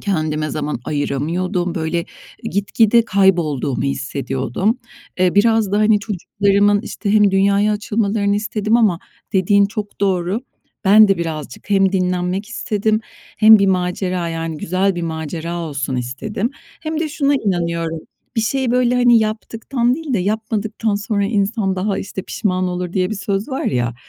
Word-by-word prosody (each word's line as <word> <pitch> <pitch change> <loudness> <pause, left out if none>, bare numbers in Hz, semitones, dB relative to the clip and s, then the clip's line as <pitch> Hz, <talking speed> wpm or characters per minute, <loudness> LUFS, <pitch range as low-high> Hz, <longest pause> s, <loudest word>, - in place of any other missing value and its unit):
kendime 155 -6 -1
zaman 150 -3 -3
ayıramıyordum. 170 +5 -2
Böyle, 165 +1 -1 0.4
gitgide 220 +4 +2
kaybolduğumu 170 - +1
hissediyordum. 135 - -2 0.4
Eee, 180 -1 +2
biraz 220 -1 +3
da, 205 - +2
hani, 215 -1 +4
çocuklarımın, 205 0 +1
işte, 210 -2 -3
hem 210 -2 +5
dünyaya 200 +2 +3
açılmalarını 205 -1 0
istedim 215 +1 0
ama 210 -8 +3 0.3
dediğin 200 +1 +4
çok 210 0 -6
doğru. 190 +1 0 0.4
Ben 210 +2 +7
de 195 -3 +2
birazcık 155 -1 -6
hem 195 -1 +3
dinlenmek 180 +1 -1
istedim 215 -2 -1 0.4
hem 220 0 +8
bir 200 - +3
macera, 180 -1 -1
yani, 165 -1 -4
güzel 185 +5 0
bir 175 - -4
macera 165 +1 -4
olsun 140 -5 -3
istedim. 195 - -3 0.3
Hem 315 0 -3
de 320 - -1
şuna 285 -1 +1
inanıyorum: 170 -7 -1 0.4
Bir - - +3
şeyi, 255 +3 0
böyle, 250 0 +2
hani, 245 -2 +5
yaptıktan 225 +3 -1
değil 300 -3 -4
de 215 - +2
yapmadıktan 215 +2 -1
sonra 205 0 -1
insan 200 -1 0
daha, 195 +1 -1
işte, 190 -1 -5
pişman 185 -2 -1
olur, 180 -1 -4
diye 185 -1 0
bir - - -2
söz 200 +2 -2
var 265 -1 -3
ya. 120 -2 0
195 Hz, 145 wpm, -19 LUFS, 170-215 Hz, 0.4 s, hem